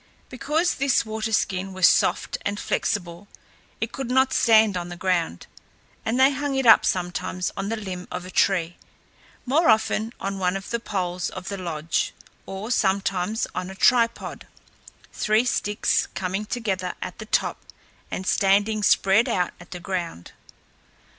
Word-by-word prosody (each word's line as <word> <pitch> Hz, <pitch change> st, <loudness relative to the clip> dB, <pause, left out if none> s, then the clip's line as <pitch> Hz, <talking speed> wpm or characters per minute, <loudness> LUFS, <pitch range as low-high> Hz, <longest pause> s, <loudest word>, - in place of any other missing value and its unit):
Because 300 Hz, +7 st, 0 dB
this 270 Hz, -3 st, +1 dB
water 220 Hz, 0 st, -3 dB
skin 190 Hz, -2 st, 0 dB
was 185 Hz, -1 st, +5 dB
soft -, -, +2 dB
and 205 Hz, 0 st, -2 dB
flexible, 180 Hz, -2 st, -2 dB, 0.5 s
it 225 Hz, +1 st, -2 dB
could 270 Hz, -3 st, -5 dB
not 260 Hz, +1 st, +3 dB
stand 220 Hz, -3 st, +5 dB
on 175 Hz, -1 st, -4 dB
the 175 Hz, -, -7 dB
ground, 175 Hz, -, -1 dB, 0.6 s
and 235 Hz, +3 st, -1 dB
they 265 Hz, +1 st, +6 dB
hung 285 Hz, 0 st, -2 dB
it 265 Hz, -1 st, 0 dB
up, 225 Hz, -, +7 dB
sometimes 180 Hz, 0 st, -2 dB
on 195 Hz, +1 st, -3 dB
the 225 Hz, -, -1 dB
limb 185 Hz, -4 st, -6 dB
of 180 Hz, 0 st, -5 dB
a 185 Hz, -, -9 dB
tree, 175 Hz, -4 st, +1 dB, 0.7 s
more 285 Hz, +4 st, +3 dB
often 220 Hz, 0 st, +2 dB
on 195 Hz, 0 st, -3 dB
one 180 Hz, 0 st, +1 dB
of 195 Hz, -, -9 dB
the 235 Hz, -, 0 dB
poles 180 Hz, -5 st, -3 dB
of 185 Hz, 0 st, -7 dB
the 200 Hz, -, -4 dB
lodge, 165 Hz, -1 st, -2 dB, 0.3 s
or 195 Hz, +5 st, -5 dB
sometimes 195 Hz, 0 st, 0 dB
on 185 Hz, 0 st, -4 dB
a 190 Hz, -, -8 dB
tripod 235 Hz, +2 st, +1 dB, 0.7 s
three 215 Hz, +2 st, +2 dB
sticks 210 Hz, -4 st, +1 dB
coming 195 Hz, +3 st, -3 dB
together 190 Hz, -7 st, -2 dB
at 180 Hz, -, -7 dB
the 215 Hz, -, -8 dB
top -, -, 0 dB, 0.5 s
and 185 Hz, -, -4 dB
standing 205 Hz, +3 st, +2 dB
spread 200 Hz, +2 st, +4 dB
out 180 Hz, -1 st, 0 dB
at 175 Hz, -, -14 dB
the 180 Hz, -, -7 dB
ground. 175 Hz, -, -5 dB
195 Hz, 160 wpm, -24 LUFS, 180-225 Hz, 0.7 s, up